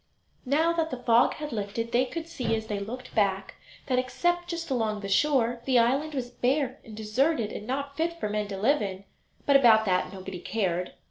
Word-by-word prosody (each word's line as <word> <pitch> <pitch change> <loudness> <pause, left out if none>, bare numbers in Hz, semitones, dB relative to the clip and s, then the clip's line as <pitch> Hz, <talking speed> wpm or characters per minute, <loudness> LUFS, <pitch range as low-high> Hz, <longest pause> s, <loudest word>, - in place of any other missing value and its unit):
Now 320 +5 +3
that 325 -1 0
the 255 - -4
fog 240 -1 +3
had 300 -1 -6
lifted 225 +2 -3
they 250 +2 +3
could 325 +5 -6
see 250 -9 -1
as 220 0 -4
they 210 -2 -3
looked 245 +6 -7
back 195 -2 +1 0.3
that, 255 -2 +1
except 350 +7 0
just 335 -3 -4
along 220 -4 0
the 200 - -5
shore, 240 +1 +2
the 260 -2 +3
island 275 +6 +2
was 245 -2 -3
bare 260 +2 0
and 215 -2 -11
deserted 225 +2 +1
and 210 - -7
not 280 +2 -3
fit 335 +1 -1
for - - -1
men 210 0 -2
to 200 -1 -5
live 260 +8 +2
in; 195 -1 -4 0.4
but 280 - +4
about 225 -5 +6
that 185 -2 +1
nobody 190 -1 -7
cared. 180 -3 -2
240 Hz, 205 wpm, -27 LUFS, 210-280 Hz, 0.4 s, about